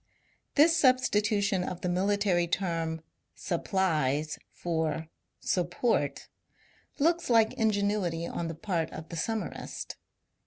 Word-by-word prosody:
This 320 Hz, +3 st, +6 dB
substitution 210 Hz, -, +3 dB
of 180 Hz, -1 st, -5 dB
the -, -, -1 dB
military 185 Hz, -1 st, +2 dB
term 165 Hz, -3 st, -1 dB
^' 160 Hz, -, -20 dB, 0.3 s
supplies 155 Hz, -5 st, 0 dB
" -, -, -50 dB
for 160 Hz, -2 st, 0 dB
^' 160 Hz, 0 st, -6 dB, 0.3 s
sup 175 Hz, -2 st, 0 dB
port 230 Hz, +6 st, 0 dB, 0.3 s
" -, -, -31 dB, 0.3 s
looks 335 Hz, +2 st, +2 dB
like 225 Hz, -1 st, +5 dB
ingenuity 205 Hz, -7 st, 0 dB
on 170 Hz, 0 st, -3 dB
the 165 Hz, -, -5 dB
part 165 Hz, -2 st, -1 dB
of 160 Hz, -, -9 dB
the 170 Hz, -, -6 dB
summarist. 220 Hz, +7 st, -4 dB
185 Hz, 130 wpm, -29 LUFS, 165-215 Hz, 0.3 s, This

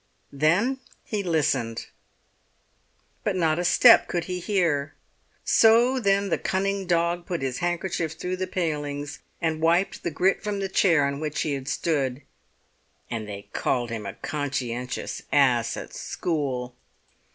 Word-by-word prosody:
Then 180 Hz, -, +2 dB, 0.2 s
he 210 Hz, -2 st, -2 dB
listened; 140 Hz, -, 0 dB, 1.4 s
but 210 Hz, -, 0 dB
not 165 Hz, -2 st, +1 dB
a -, -, 0 dB
step 230 Hz, +6 st, +7 dB
could 175 Hz, -1 st, -1 dB
he 180 Hz, +1 st, -4 dB
hear. 170 Hz, -7 st, 0 dB, 0.5 s
So 235 Hz, +4 st, +5 dB
then 200 Hz, -2 st, +2 dB
the -, -, 0 dB
cunning 195 Hz, 0 st, -1 dB
dog 170 Hz, 0 st, +1 dB
put 175 Hz, -7 st, -3 dB
his 130 Hz, -2 st, -2 dB
handkerchief 175 Hz, -2 st, -1 dB
through 180 Hz, +2 st, -4 dB
the 185 Hz, 0 st, -2 dB
palings 145 Hz, -4 st, -3 dB, 0.2 s
and 160 Hz, -2 st, -1 dB
wiped 170 Hz, +4 st, +2 dB
the -, -, -2 dB
grit 180 Hz, +5 st, +1 dB
from 210 Hz, -1 st, -2 dB
the 195 Hz, -1 st, -2 dB
chair 165 Hz, -6 st, +3 dB
on 140 Hz, 0 st, -2 dB
which 155 Hz, -1 st, -2 dB
he 150 Hz, -, -1 dB
had 135 Hz, -1 st, -5 dB
stood. 140 Hz, -3 st, -1 dB, 0.9 s
And 110 Hz, -3 st, -4 dB
they 100 Hz, 0 st, -8 dB
called 120 Hz, -2 st, -1 dB
him 110 Hz, -3 st, -4 dB
a -, -, -6 dB
conscientious 125 Hz, -4 st, -3 dB
ass 125 Hz, -5 st, +3 dB
at -, -, -8 dB
school! 130 Hz, -7 st, -3 dB
160 Hz, 145 wpm, -25 LUFS, 140-185 Hz, 1.4 s, step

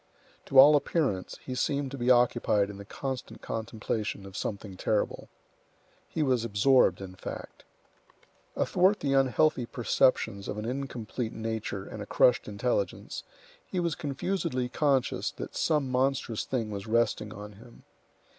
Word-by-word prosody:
To 135 Hz, -, 0 dB
all 145 Hz, +3 st, +10 dB
appearance, 140 Hz, -, 0 dB
he 130 Hz, -, -4 dB
seemed 140 Hz, +1 st, -1 dB
to 140 Hz, -, -6 dB
be 120 Hz, +1 st, 0 dB
occupied 120 Hz, -4 st, +3 dB
in 100 Hz, -, -10 dB
the 100 Hz, -, -9 dB
constant 130 Hz, +4 st, -6 dB
contemplation 110 Hz, -2 st, -3 dB
of 95 Hz, -1 st, -11 dB
something 100 Hz, -2 st, -4 dB
terrible. 105 Hz, +3 st, -1 dB, 0.8 s
He 160 Hz, -, -1 dB
was 130 Hz, -5 st, +2 dB
absorbed, 105 Hz, -3 st, +3 dB
in 95 Hz, -1 st, -7 dB
fact. 95 Hz, -, -8 dB, 0.9 s
Athwart 190 Hz, +3 st, +2 dB
the 140 Hz, -1 st, +1 dB
unhealthy 135 Hz, -1 st, +3 dB
perceptions 115 Hz, -5 st, +1 dB
of -, -, -4 dB
an 105 Hz, -, -4 dB
incomplete 125 Hz, -2 st, -4 dB
nature 110 Hz, -1 st, -4 dB
and -, -, -8 dB
a -, -, -6 dB
crushed -, -, +3 dB
intelligence, -, -, -2 dB, 0.4 s
he 185 Hz, -, -4 dB
was 170 Hz, -2 st, 0 dB
confusedly 145 Hz, -3 st, -2 dB
conscious 135 Hz, -1 st, +1 dB
that -, -, -7 dB
some 150 Hz, -4 st, +1 dB
monstrous 130 Hz, -3 st, 0 dB
thing 115 Hz, -5 st, -2 dB
was 100 Hz, +1 st, -5 dB
resting 110 Hz, -2 st, +1 dB
on 105 Hz, 0 st, -8 dB
him. 115 Hz, +4 st, -16 dB
125 Hz, 145 wpm, -29 LUFS, 105-140 Hz, 0.9 s, all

